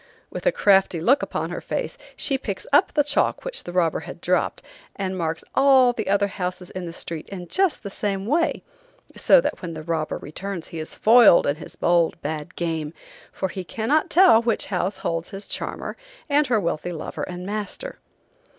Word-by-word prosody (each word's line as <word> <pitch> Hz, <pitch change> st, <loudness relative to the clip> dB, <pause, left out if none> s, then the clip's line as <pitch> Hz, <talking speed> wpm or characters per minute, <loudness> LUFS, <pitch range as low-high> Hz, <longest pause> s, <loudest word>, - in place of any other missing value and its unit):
With -, -, -4 dB
a -, -, +6 dB
crafty 195 Hz, -, +3 dB
look 260 Hz, -, +3 dB
upon -, -, -3 dB
her -, -, -5 dB
face, -, -, -3 dB, 0.2 s
she 275 Hz, -, +1 dB
picks 205 Hz, -7 st, -4 dB
up 290 Hz, -, +5 dB
the 295 Hz, -1 st, +3 dB
chalk 295 Hz, -, 0 dB
which -, -, -3 dB
the -, -, -6 dB
robber 175 Hz, -2 st, +1 dB
had -, -, -9 dB
dropped, -, -, 0 dB, 0.3 s
and 190 Hz, -1 st, -3 dB
marks 165 Hz, -2 st, -2 dB
all 265 Hz, -2 st, +5 dB
the -, -, -4 dB
other 200 Hz, 0 st, +3 dB
houses 180 Hz, -2 st, -5 dB
in 185 Hz, -2 st, -5 dB
the -, -, -5 dB
street 165 Hz, -1 st, -5 dB
in 180 Hz, -3 st, -7 dB
just 380 Hz, -, +1 dB
the 200 Hz, -, -5 dB
same 195 Hz, -1 st, -2 dB
way, 310 Hz, +9 st, +1 dB, 0.5 s
so -, -, +6 dB
that -, -, -3 dB
when 170 Hz, -3 st, -5 dB
the 155 Hz, -, -7 dB
robber 160 Hz, -1 st, -2 dB
returns 180 Hz, +3 st, -6 dB
he 165 Hz, -, -6 dB
is 155 Hz, -, -5 dB
foiled 225 Hz, -4 st, +6 dB
in 145 Hz, +1 st, 0 dB
his -, -, -10 dB
bold, 170 Hz, -1 st, +2 dB
bad 155 Hz, +3 st, -5 dB
game, 160 Hz, -2 st, -3 dB, 0.4 s
for 190 Hz, -, -3 dB
he 185 Hz, +1 st, -5 dB
cannot 230 Hz, -, 0 dB
tell 355 Hz, -10 st, +6 dB
which 235 Hz, -1 st, 0 dB
house 185 Hz, +2 st, -1 dB
holds 165 Hz, 0 st, -3 dB
his 200 Hz, -1 st, -7 dB
charmer, -, -, -4 dB, 0.3 s
and 295 Hz, -1 st, +3 dB
her 235 Hz, -3 st, +2 dB
wealthy 170 Hz, -2 st, -2 dB
lover 165 Hz, -3 st, -6 dB
and 180 Hz, 0 st, -5 dB
master. 215 Hz, -, -5 dB
190 Hz, 195 wpm, -23 LUFS, 170-235 Hz, 0.5 s, a